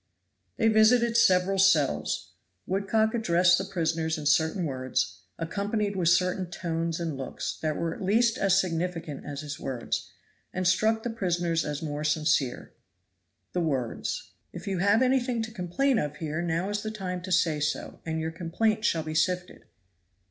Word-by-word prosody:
They 225 - +3
visited 230 +2 +4
several 195 -4 +4
cells. 165 -8 +2 0.3
Woodcock 210 +3 +1
addressed 180 -5 +4
the - - -1
prisoners 165 -3 -1
in 150 - -6
certain 160 +4 +2
words, 130 - -2 0.2
accompanied 200 +4 -2
with 175 -3 +2
certain 180 0 +2
tones 165 -1 -2
and 165 -4 -2
looks, 135 -1 -5
that 155 -1 -1
were 165 -1 -1
at - - -10
least 225 +4 +2
as 195 -1 +4
significant 165 -4 -3
as 145 0 -5
his 145 -1 -6
words, 125 -3 -3 0.4
and 185 0 -1
struck 220 +4 +2
the 240 - -2
prisoners 175 -6 0
as 150 +1 -4
more 150 -1 -3
sincere. 150 -4 0 0.8
The 180 - 0
words. 135 -8 -2 0.2
"If - - -9
you 195 -2 -2
have 205 +6 +4
anything 250 -2 +1
to 220 - -6
complain 220 +7 +1
of 150 0 -3
here, 155 +1 -3
now 170 +2 -1
is 205 0 -1
the 215 - -4
time 185 -4 -4
to 185 +1 -7
say 165 -4 +2
so, 150 +1 -3
and 160 -1 -2
your 160 0 -2
complaint 210 +6 0
shall 165 -5 +1
be 155 0 -5
sifted." 180 +3 -1
175 Hz, 165 wpm, -27 LUFS, 160-205 Hz, 0.8 s, visited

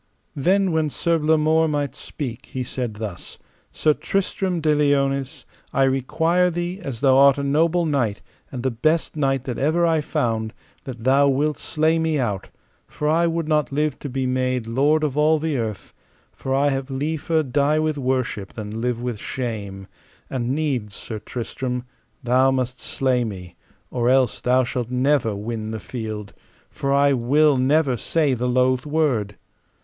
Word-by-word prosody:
Then 185 +6 +2
when 160 -1 +1
Sir 165 +3 0
Blamore 155 +1 +3
might 145 -4 -1
speak, 130 -3 -7
he 130 - -4
said 120 -3 -4
thus: 105 -5 -7 0.3
Sir 155 - +2
Tristram 190 0 -1
de 155 -1 +2
Liones, 140 -2 0 0.3
I 135 - +3
require 160 +7 +2
thee, 175 +2 -3
as 135 -9 -6
thou 135 -2 +5
art 140 0 +6
a 140 - -2
noble 165 +5 +2
knight, 125 -9 0 0.3
and 125 -2 -5
the 130 - +1
best 155 +10 0
knight 135 -3 0
that 125 -3 -4
ever 160 +5 +2
I 165 -2 +2
found, 110 -5 -2 0.3
that 125 -4 -7
thou 135 +3 +4
wilt 145 +2 +1
slay 160 +1 +1
me 160 -1 +1
out, 105 -8 -2 0.4
for 150 - -4
I 165 +2 +3
would 165 -1 -1
not 150 -1 +1
live 150 0 -1
to 145 - -6
be 130 0 -2
made 130 -1 0
lord 145 +7 +2
of 145 -2 -1
all 155 +1 +4
the 155 -1 -2
earth, 110 -3 -5 0.4
for 135 - -6
I 140 +1 +3
have 135 0 -2
liefer 155 +3 -1
die 145 +3 +1
with 155 -1 0
worship 130 -6 -2
than 110 0 -6
live 125 -1 -1
with 120 -3 -4
shame; 100 -7 -5 0.5
and 125 -2 -2
needs, 130 -10 -2
Sir 110 -2 -6
Tristram, 125 +2 -4 0.4
thou 130 +2 +4
must 130 -1 -2
slay 130 -2 0
me, 90 -6 -7 0.4
or 120 0 +1
else 130 -1 +2
thou 130 +1 +3
shalt 120 -1 -3
never 125 -3 +1
win 110 +1 -4
the 110 0 -4
field, 105 0 -6 0.4
for 140 - -2
I 140 0 +4
will 140 +4 +3
never 135 +1 +2
say 150 +4 +1
the 125 0 -1
loath 130 +2 +2
word. 135 -10 0
135 Hz, 170 wpm, -22 LUFS, 120-155 Hz, 0.5 s, art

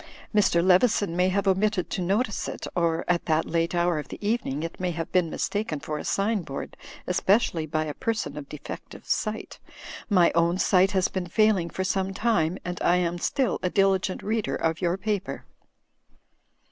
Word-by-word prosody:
"Mr. 185 -5 +3
Leveson 190 -1 +3
may 180 +1 +3
have 200 +1 0
omitted 195 0 +1
to 185 - -2
notice 205 +5 0
it, - - -5
or, 170 -1 +1
at 175 -1 +1
that 160 0 +1
late 165 +1 0
hour 170 -2 +2
of 150 - -7
the - - -8
evening, 185 - -1
it 165 - -6
may 185 -1 -1
have 165 -1 -4
been 180 -3 +2
mistaken 200 -3 -2
for 150 +1 -4
a - - -5
sign 205 +1 0
board, 140 -4 -7 0.3
especially 180 -3 +1
by 155 0 -1
a 150 - -4
person 220 -10 -2
of 145 -2 -8
defective 150 - -9
sight. 215 -1 -2 0.5
My 180 -5 +5
own 170 +1 +2
sight 190 0 +4
has 190 -1 +3
been 185 -2 -4
failing 195 -2 +2
for 190 - -3
some 190 0 -1
time; 190 -7 +1
but 180 0 -4
I 175 - +4
am 175 -1 0
still 260 +2 0
a 180 - 0
diligent 195 -1 +1
reader 220 0 -1
of 165 0 -1
your 175 0 +1
paper." 205 0 -3
180 Hz, 185 wpm, -26 LUFS, 170-200 Hz, 0.5 s, My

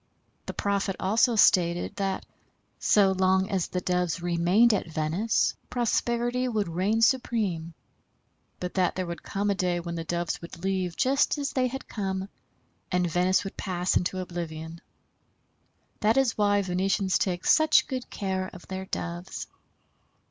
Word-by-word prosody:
The - - -4
prophet 200 -1 0
also 225 +5 +3
stated 175 -4 +3
that, 195 -1 -2 0.5
so 200 -2 +4
long 190 +1 +2
as 190 -3 0
the 180 - -3
Doves 180 -1 0
remained 175 +7 +3
at 195 - -1
Venice 165 +8 0 0.2
prosperity 240 +1 0
would 215 -5 -1
reign 195 +7 +1
supreme, 205 - 0 0.8
but 180 0 -4
that 185 -2 +1
there 185 - -2
would 170 0 -6
come 200 +1 -1
a - - +3
day 180 -2 0
when 170 0 -5
the 165 -1 -4
Doves 170 +1 -2
would 170 +1 -10
leave 185 -3 -1
just 275 +3 +2
as 285 -1 -2
they 255 -1 +2
had 265 +2 -6
come, 190 -2 -3 0.6
and 180 -1 +2
Venice 180 +3 +2
would 195 - -7
pass 180 -1 -1
into 180 +1 0
oblivion. 165 -2 -6 1.2
That 220 +4 +2
is 265 -4 +3
why 205 -1 +2
Venetians 190 +1 +1
take 180 -2 -1
such 315 -1 +5
good 255 -2 -5
care 190 -1 -3
of 180 - -13
their 190 0 -4
Doves. 175 +1 -5
190 Hz, 150 wpm, -27 LUFS, 175-210 Hz, 1.2 s, such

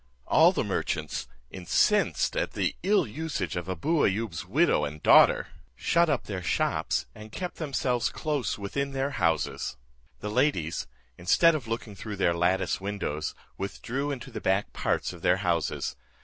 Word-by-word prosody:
All - - +6
the - - -1
merchants, 60 - -2 0.2
incensed 90 -2 +2
at - - -1
the - - 0
ill 200 +2 +3
usage 130 - -3
of 90 0 -4
Abou 145 - +1
Ayoub's 100 -5 -1
widow - - +3
and 75 +1 -5
daughter, - - +6 0.3
shut 170 -1 +2
up 145 - +1
their 95 -3 -5
shops, - - 0
and 110 0 -11
kept 180 +8 -5
themselves 130 -6 0
close 150 -4 -2
within 140 +8 -3
their 135 +1 -1
houses. 85 - -1 0.4
The 105 - -4
ladies, 105 - 0 0.3
instead 165 - +5
of 140 -7 -3
looking 115 -1 -4
through 105 +1 -6
their 95 -3 +2
lattice 90 +3 +1
windows, 95 -7 -3 0.2
withdrew 130 +8 -3
into 135 -4 -5
the - - -6
back 95 +2 0
parts - - -1
of 85 - -12
their 90 +2 +3
houses. 85 -5 -1
105 Hz, 155 wpm, -28 LUFS, 90-140 Hz, 0.4 s, All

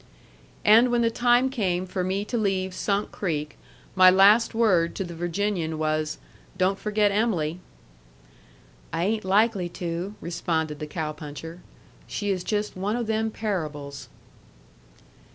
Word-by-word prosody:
And 225 +4 +7
when 240 -1 +2
the 230 - +2
time 245 +2 +3
came 185 -8 -1
for 185 0 -3
me 190 +3 -1
to 240 - -4
leave 190 -4 0
Sunk 200 +2 -1
Creek, 150 -6 -3 0.4
my 185 -1 +7
last 200 +5 +5
word 185 -8 +2
to 195 - -2
the 175 -2 -7
Virginian 175 -1 -2
was, 155 0 -1 0.4
"Don't 185 +2 +1
forget 210 -1 +1
Em'ly." 180 -7 0 1.3
"I 170 - -1
ain't 215 +3 0
likely 200 -2 +2
to," 175 +3 -4
responded 160 -3 -2
the 150 - -5
cow 155 0 -3
puncher. 155 +3 -9 0.5
"She 205 -1 -2
is 185 -2 -2
just 210 +2 -2
one 200 +4 -2
o' 240 - -1
them 220 0 0
parables." 155 -11 -4
190 Hz, 140 wpm, -25 LUFS, 165-210 Hz, 1.3 s, And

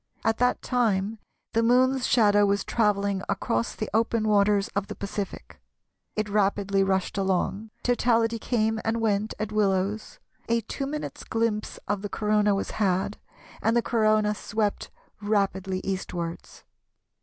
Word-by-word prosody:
At 225 0 +1
that 250 0 +2
time 220 -4 0 0.3
the 230 - +3
Moon's 255 +2 +3
shadow 205 -4 +4
was 200 0 +1
travelling 200 -3 +1
across 115 - -1
the 215 - -3
open 225 0 +1
waters 205 0 +3
of 200 -2 -2
the - - -6
Pacific. 200 0 -6 0.5
It 215 0 -1
rapidly 200 -1 +1
rushed 190 +1 0
along; 195 +3 -1
totality 230 -2 +2
came 220 -1 0
and 225 +1 0
went 215 -1 0
at 215 0 -3
Willows; 205 0 0 0.3
a 230 0 +2
two 270 +5 -4
minutes' 300 +1 -5
glimpse 225 -2 -1
of 205 -1 -1
the 205 - -4
Corona 210 -1 +2
was 195 - -3
had, 195 0 0 0.4
and 225 +2 +2
the 235 - +2
Corona 215 -2 +2
swept 210 0 -2 0.3
rapidly 195 -2 0
eastwards. 175 -3 -5
210 Hz, 140 wpm, -26 LUFS, 200-225 Hz, 0.5 s, shadow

